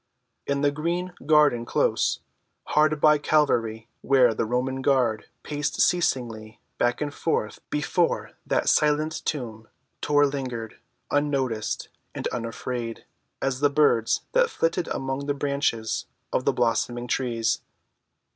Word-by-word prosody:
In 140 0 0
the 145 0 +3
green 170 +4 -2
garden‐close, 145 -5 +2 0.5
hard 155 0 +3
by 150 0 +5
Calvary, 115 -8 +1
where 130 -4 +4
the 110 - -1
Roman 130 +3 -1
guard 125 -6 +1 0.2
paced 150 0 -3
ceaselessly 115 -11 0 0.2
back 120 +3 +1
and 145 -1 -2
forth 110 -11 -1
before 165 +4 0 0.2
that - - +1
silent 150 +1 +2
tomb, 115 -6 -4 0.3
Tor 145 0 +4
lingered, 130 -5 -4 0.3
unnoticed 135 -7 -1 0.3
and - - -5
unafraid 115 0 -4 0.4
as 135 -1 0
the 145 0 +4
birds 140 -6 +3
that - - +3
flitted 175 - 0
among 135 +1 -3
the 145 - 0
branches 140 -6 -1 0.3
of - - 0
the - - +3
blossoming 120 +1 0
trees. 115 -3 0
135 Hz, 120 wpm, -25 LUFS, 115-150 Hz, 0.5 s, by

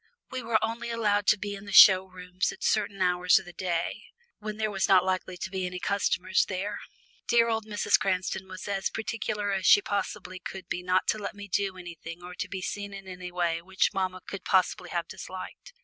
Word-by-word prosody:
We 260 -1 -3
were 230 -1 +2
only 230 +1 -4
allowed 210 -3 +1
to 215 - +6
be 205 0 -4
in 200 +1 -8
the 205 - -8
show 190 -1 +9
rooms 180 0 -3
at - - -10
certain 200 -2 +1
hours 180 0 +4
of - - -2
the 175 - -11
day, 175 -1 -2 0.4
when 215 0 -5
there 215 -1 -1
were 195 - -5
not 185 -1 +6
likely 185 -1 -2
to 190 - -5
be 190 -1 -2
any 180 0 -5
customers 190 -2 +1
there. 200 +2 -3 0.5
Dear 235 -1 +4
old 220 -1 -1
Mrs. 205 -1 +2
Cranston 185 0 -1
was 185 +1 -8
as 195 -1 -1
particular 215 -2 -3
as 190 -1 0
she - - +9
possibly 200 - -3
could 190 +1 -8
be 180 - -3
not 180 +1 +1
to 215 - +1
let 200 - -5
me 205 0 -9
do 195 0 -1
anything 170 -1 -9
or 180 0 -8 0.2
be 190 -2 -5
seen 200 0 -4
in 195 -1 -10
any 180 -1 -7
way 170 -2 0
which 190 +2 0
mamma 185 -1 -2
could 195 - -6
possibly 180 -1 +1
have 170 -1 -2
disliked. 185 - -9
190 Hz, 210 wpm, -28 LUFS, 180-205 Hz, 0.5 s, show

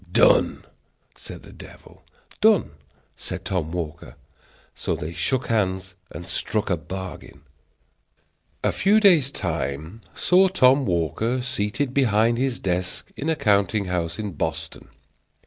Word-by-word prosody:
"Done!" - - +4 0.5
said - - -10
the - - -13
devil. - - -14 0.4
"Done!" 215 -4 +4 0.4
said - - -6
Tom 85 -5 -2
Walker. 85 -2 -5 0.6
So - - -2
they 80 +3 -6
shook 130 +7 -1
hands 95 -4 -1 0.2
and 85 - -8
struck 105 +3 -2
a 90 - +2
bargain. 95 +4 -8 1.2
A - - +2
few 210 +3 +3
days' 175 -10 +5
time 85 - -4
saw 185 +2 +4
Tom 135 - +4
Walker 90 - 0
seated 125 +2 -2
behind 115 -3 +3
his 130 -2 0
desk 90 -1 -3
in 150 - -3
a 160 - +2
counting 100 - +2
house 85 -2 -2
in 105 -2 -4
Boston. 80 0 -4
105 Hz, 130 wpm, -24 LUFS, 90-130 Hz, 1.2 s, days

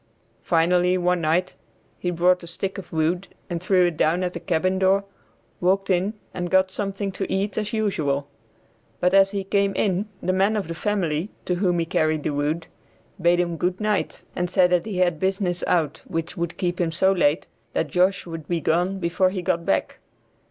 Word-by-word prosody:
Finally 180 +2 +3
one 180 -1 +1
night 165 +4 +1 0.5
he 180 - -1
brought 180 +1 +3
a 170 - -10
stick 190 +4 -4
of 180 - -11
wood 165 +4 0 0.2
and 170 -1 -2
threw 185 0 +3
it 175 -3 -1
down 170 +4 +2
at 180 0 -3
a - - -3
cabin 185 +3 0
door, 190 +1 +3 0.6
walked 195 +2 +1
in 190 +4 +1 0.2
and 175 -1 -3
got 190 +1 +3
something 195 0 -3
to 190 0 -4
eat 195 +1 -1
as 210 -1 -2
usual. 155 -11 0 0.7
But 180 +1 +2
as 195 0 +6
he 200 -1 -3
came 200 0 +1
in, 200 +1 0
the 185 - -1
man 195 +3 +2
of 205 -6 -2
the 165 - -4
family, 175 -2 -1 0.2
to 180 - 0
whom 180 -1 +1
he 165 - 0
carried 155 -3 0
the 150 - -1
wood, 150 +3 -1 0.6
bade 175 +1 +4
him 170 -1 0
good 180 +2 -1
night, 210 -2 -1
and 180 0 -1
said 180 -1 +3
that 180 +2 +2
he 200 -4 -4
had 175 -3 +2
business 190 -1 -1
out 160 -4 +1
which 165 -2 -3
would 170 -1 -3
keep 180 -1 -1
him 165 -2 0
so 190 +4 +3
late, 170 -4 +2 0.3
that - - -1
Josh 185 +2 +2
would 165 -3 -7
be 170 -1 0
gone 175 +5 +1
before 185 +1 +1
he 185 -1 -4
got 170 0 -1
back. 95 - 0
180 Hz, 200 wpm, -24 LUFS, 170-195 Hz, 0.7 s, as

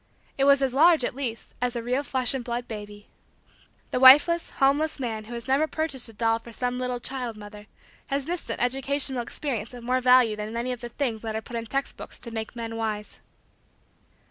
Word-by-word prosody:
It 275 - +1
was 280 -1 +5
as 260 -2 0
large, 315 -1 +5
at - - -3
least, 245 -4 -5
as 250 0 -1
a 235 - -3
real 250 +3 0
flesh 260 -3 0
and 265 -2 -3
blood 240 0 -4
baby. 205 -1 -9 0.8
The - - 0
wifeless, 295 +6 +7
homeless, 285 +3 +1
man 220 -4 -4
who 240 +2 -8
has 235 +2 -7
never 275 +4 +2
purchased 310 -7 +3
a - - -13
doll 225 +1 +1
for 235 - -13
some 250 +2 -3
little 250 -1 -2
child 245 -3 -5
mother 210 0 -11 0.4
has 275 +1 -2
missed 350 0 -3
an - - -2
educational 270 +1 0
experience 240 -2 -4
of 240 - -10
more 255 +2 0
value 250 -3 +5
than 210 +1 -6
many 235 +2 -2
of 245 - -5
the 240 - -6
things 235 -4 -3
that 220 -1 -4
are 220 - -2
put 240 - -9
in 230 -1 -4
text 275 +4 -3
books - - -10
to 235 - -7
make 220 0 -5
men 225 -1 -5
wise. 215 -2 -4
245 Hz, 215 wpm, -26 LUFS, 225-270 Hz, 0.8 s, wifeless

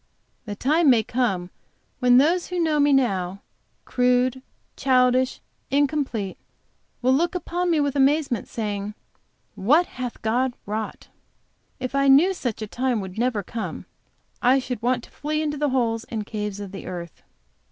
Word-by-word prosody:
The 205 -2 -5
time 300 +7 +3
may 235 -4 +5
come 195 -8 -1 0.5
when 250 -1 +5
those 335 +7 +3
who 360 0 -3
know 315 -3 +2
me 290 0 +4
now, 195 -8 +1 0.4
crude, 250 +1 +2 0.3
childish, 255 -1 +2 0.3
incomplete, 275 -8 0 0.6
will 255 +1 +4
look 345 +6 +1
upon 355 +1 -1
me 325 -3 +3
with 285 -1 0
amazement, 275 -3 +2
saying, 210 -2 -4 0.6
"What 295 - +3
hath 250 -5 -6
God 245 +3 +1
wrought!" 215 +1 -5 0.7
If 255 0 -4
I 275 0 +2
knew 300 +8 +6
such 240 - -4
a - - -5
time 250 +1 -1
would 190 +1 -6
never 235 -4 0
come, 195 -4 -5 0.6
I 255 +2 +5
should 250 -3 -4
want 245 0 0
to - - -15
flee 305 +1 -2
into 300 -1 -1
the 295 0 +1
holes 230 -3 0
and 220 -3 -4
caves 210 -2 -4
of 200 -2 -7
the 195 - -8
earth. 170 -2 -7
250 Hz, 155 wpm, -24 LUFS, 215-285 Hz, 0.7 s, knew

